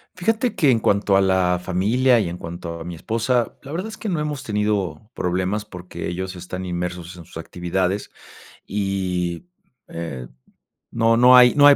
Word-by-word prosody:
Fíjate 225 +6 0
que 145 -4 +4
en 115 - +3
cuanto 100 -2 +2
a 95 - +5
la 95 -2 +2
familia 115 +8 +3
y 100 - 0
en 85 - -5
cuanto 85 -1 -6
a - - -6
mi 85 +1 -6
esposa, 115 +7 0
la 140 - -10
verdad 180 +7 -3
es 220 - -9
que 215 - -4
no 170 -4 0
hemos 150 -2 -2
tenido 105 -1 -1
problemas, 95 +4 -1
porque 90 -3 -7
ellos 95 +2 -4
están 90 +1 -6
inmersos 90 -1 -4
en 85 - -11
sus - - -11
actividades 90 +3 -2 0.6
y, 95 - -2 0.4
eh, 75 -7 -6 0.6
no, 115 0 +3
no 125 +2 +8
hay, 125 -1 +8
no 145 -1 +8
hay 145 - +9
95 Hz, 180 wpm, -22 LUFS, 90-120 Hz, 0.6 s, hay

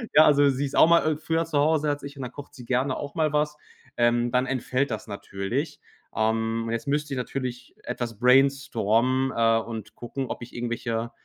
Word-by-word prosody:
Ja, 155 - +9
also 145 -1 +5
sie 135 +1 0
ist 140 - -5
auch - - +7
mal 165 -2 +4
i - - -6
früher 165 +1 -1
zu 160 -3 0
Hause 155 +1 +2
als 145 0 -2
ich 140 +1 -8
und 135 - -5
dann 125 - -6
kocht 145 +2 -11
sie 125 - -11
gerne 130 +2 0
auch 145 -1 -6
mal 155 -3 +1
was. 150 0 +1 0.4
Ähm, 120 0 +2
dann 125 +1 +1
entfällt 130 +1 -1
das 110 - -4
natürlich, 115 +9 -4 0.4
ähm, 115 +1 0
jetzt 115 +5 -3
müsst 145 +1 -1
ich 135 - -2
natürlich 125 -1 -5
etwas 115 -3 -4
brainstormen, 130 -1 +3
äh, 115 -1 +3
und 115 -2 -7
gucken, 130 +3 -5
ob - - -5
ich 120 - -12
irgendwelche, 115 -1 -3
130 Hz, 205 wpm, -25 LUFS, 115-145 Hz, 0.4 s, Ja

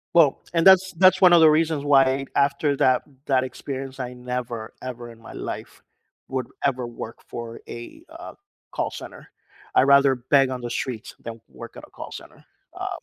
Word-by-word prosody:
Well, 155 -5 +5
and 165 +2 +3
that's 190 0 +6
that's 190 0 +5
one 180 -1 +7
of 170 - +7
the 160 -1 +7
reasons 155 -2 +1
why 135 -1 +3
after 140 +1 +1
that 130 -1 +3 0.2
that 130 -2 +2
experience, 135 +1 -7
I 125 0 -5
never 125 -2 -5
ever 120 -2 -7
in 115 -1 -15
my - - -12
life - - -7 0.5
would 130 -2 -3 0.2
ever 130 -3 0
work 115 -1 -8
for 115 -1 -7
a, 120 - -10
uh, 335 +2 -10 0.4
call - - -2
center. - - -10 0.5
I'd - - +6
rather 140 -1 +5
beg 130 +2 +2
on 125 -1 -5
the 120 - -5
streets 120 -1 -4
than 115 -1 -8
work 65 - -11
at - - -10
a - - -28
call - - -9
center, - - -12 0.3
uh, - - -4
130 Hz, 185 wpm, -23 LUFS, 120-145 Hz, 0.5 s, one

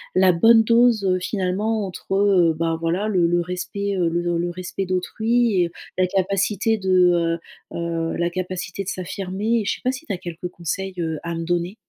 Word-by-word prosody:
la 185 0 +6
bonne 225 +6 +6
dose, 230 -2 +4
heu, 185 -1 +2
finalement, 200 +3 -1
entre, 185 +1 -6
heu, 190 -5 +4
ben, 165 0 0
voilà, 175 +6 0
le 185 -5 +2
le 175 +1 +2
respect, 195 +3 -3
heu, 175 -2 +2
le 175 0 -1
le 175 +1 -1
respect 185 +2 -4
d'autrui 220 +2 +1
et 170 - -3 0.3
la 185 - +3
capacité 195 +3 +1
de, 180 -3 +3 0.3
heu, - - -4
heu, 165 -1 -2
la 170 0 +1
capacité 185 +1 -4
de 195 - -5
s'affirmer, 195 +5 -2
et 205 - -5
je - - 0
sais - - -15
pas 255 - +2
si 265 +4 -8
tu 200 - -3
as - - -3
quelques 175 0 -6
conseils, 185 +3 -4
heu, 160 -2 -2
à 170 - -3
me 165 - -3
donner? 175 +3 -1
185 Hz, 200 wpm, -22 LUFS, 175-200 Hz, 0.3 s, la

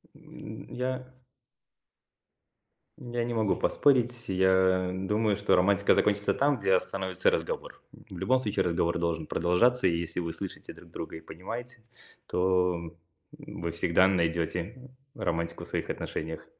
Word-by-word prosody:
М, - - -10
я 130 0 -4 1.7
я 120 -1 -3
не 120 - -2
могу 110 -4 +2
поспорить. 120 -3 +2
Я 95 -1 +3
думаю, 105 +3 +1
что 100 +1 +2
романтика 100 +2 +4
закончится 105 0 +2
там, 140 0 +2
где 95 -3 +1
остановится 95 0 +1
разговор. - - -3
В - - -13
любом 130 +1 +2
случае 105 -5 0
разговор 85 0 +1
должен 85 -2 -1
продолжаться. 105 +12 +2
И 85 - +1
если 85 +1 -4
вы 85 -1 -2
слышите - - -7
друг - - -16
друга - - -6
и 80 - -8
понимаете, 115 +8 -8 0.4
то 90 -2 +1 0.4
вы 85 0 -6
всегда 85 +2 +3
найдете 85 +7 -1 0.2
романтику 85 0 -2
в - - -8
своих - - -3
отношениях. 80 +1 -4
95 Hz, 135 wpm, -29 LUFS, 85-120 Hz, 1.7 s, романтика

